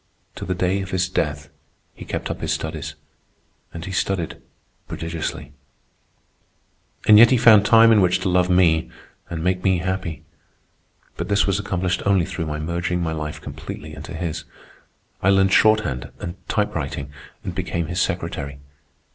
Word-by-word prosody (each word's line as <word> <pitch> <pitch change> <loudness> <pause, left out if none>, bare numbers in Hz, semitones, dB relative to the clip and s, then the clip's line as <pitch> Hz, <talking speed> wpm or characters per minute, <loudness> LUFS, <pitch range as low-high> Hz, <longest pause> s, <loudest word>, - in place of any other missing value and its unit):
To - - -5
the 95 - -2
day 90 +2 0
of 95 - -6
his 90 -1 0
death 75 -5 -2 0.4
he - - -11
kept - - -4
up - - -6
his - - -1
studies, - - -4 0.8
and 85 0 -7
he 95 - -6
studied 95 -2 -2 0.5
prodigiously. 80 -2 -5 1.5
And 105 -1 +9
yet 115 +1 +9
he 130 - +4
found 110 -3 +6
time 115 0 +7
in 110 -2 +5
which 90 -1 +3
to - - -1
love 90 0 +2
me 85 -3 +3 0.4
and 80 -1 -4
make 90 0 0
me 95 -2 +3
happy. 90 -2 -3 0.9
But - - -3
this 100 0 +3
was 100 0 0
accomplished 95 -2 -1
only 100 -3 +3
through 80 - -4
my 75 0 -3
merging 85 +3 -2
my 85 -2 -1
life 75 -1 -5
completely 75 -1 -8
into - - -8
his. 80 -2 -4 0.8
I 95 - +3
learned 95 0 +4
shorthand 105 - +3
and 85 - -5 0.2
typewriting, 70 0 -2 0.3
and 90 - -4
became 90 -2 -2
his 85 +3 -2
secretary. 85 -6 -3
90 Hz, 160 wpm, -22 LUFS, 80-95 Hz, 1.5 s, And